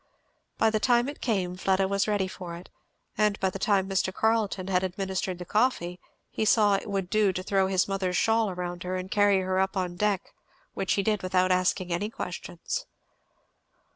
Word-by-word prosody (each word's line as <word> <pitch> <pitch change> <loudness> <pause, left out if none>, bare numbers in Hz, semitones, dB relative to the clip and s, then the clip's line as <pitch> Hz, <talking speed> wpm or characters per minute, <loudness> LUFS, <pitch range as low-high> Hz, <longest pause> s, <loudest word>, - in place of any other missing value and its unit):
By 225 0 +3
the 215 - +1
time 240 +2 +3
it 285 - -7
came 190 -7 -1
Fleda 190 +1 +1
was 200 +1 0
ready 205 -3 +1
for 180 -2 -7
it, 175 - -12 0.5
and 210 -1 +2
by 190 -1 +1
the 195 - -6
time 195 -3 +2
Mr. 190 -1 0
Carleton 215 -2 0
had 185 -1 +1
administered 190 0 -2
the 180 - -7
coffee 180 -5 0 0.3
he - - -2
saw 215 -1 +4
it 195 - -1
would 195 -2 -1
do 210 0 +3
to 185 0 -4
throw 195 0 +2
his 190 -1 +1
mother's 190 -2 -1
shawl 225 -2 +2
round 175 -1 -5
her 180 +1 -3
and 185 +1 -5
carry 205 -2 +4
her 185 0 0
up 190 +1 0
on 180 -2 -2
deck, 205 -1 -1 0.4
which 195 -2 0
he 200 - +1
did 210 0 +1
without 185 0 +1
asking 185 0 +1
any 205 +5 -1
questions. 175 -4 -5
190 Hz, 195 wpm, -27 LUFS, 185-210 Hz, 0.5 s, saw